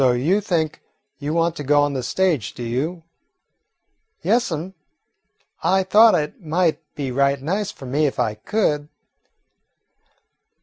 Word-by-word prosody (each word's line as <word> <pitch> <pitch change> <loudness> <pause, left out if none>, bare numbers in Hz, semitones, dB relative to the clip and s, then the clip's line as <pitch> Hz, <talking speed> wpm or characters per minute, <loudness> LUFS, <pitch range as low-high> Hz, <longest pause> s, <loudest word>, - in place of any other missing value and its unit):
"So 130 -2 +4
you 160 +12 +1
think 165 -6 -1 0.4
you 145 +1 -3
want 165 0 +1
to 145 - -4
go 145 +1 +4
on 145 -1 0
the 130 - -2
stage, 155 - 0
do 120 - -6
you?" 150 +9 -3 1.2
"Yes, 235 -3 +2
'm, 165 +4 -4 0.9
I 190 +1 +2
thought 215 +4 +6
it 150 +4 -3
might 165 +1 +1
be 135 -3 -3
right 140 +1 +2
nice 190 +9 -2
for 135 - -12
me 145 +4 +1
if 135 - -4
I 115 -4 0
could." 150 - -1
150 Hz, 145 wpm, -22 LUFS, 135-180 Hz, 1.2 s, thought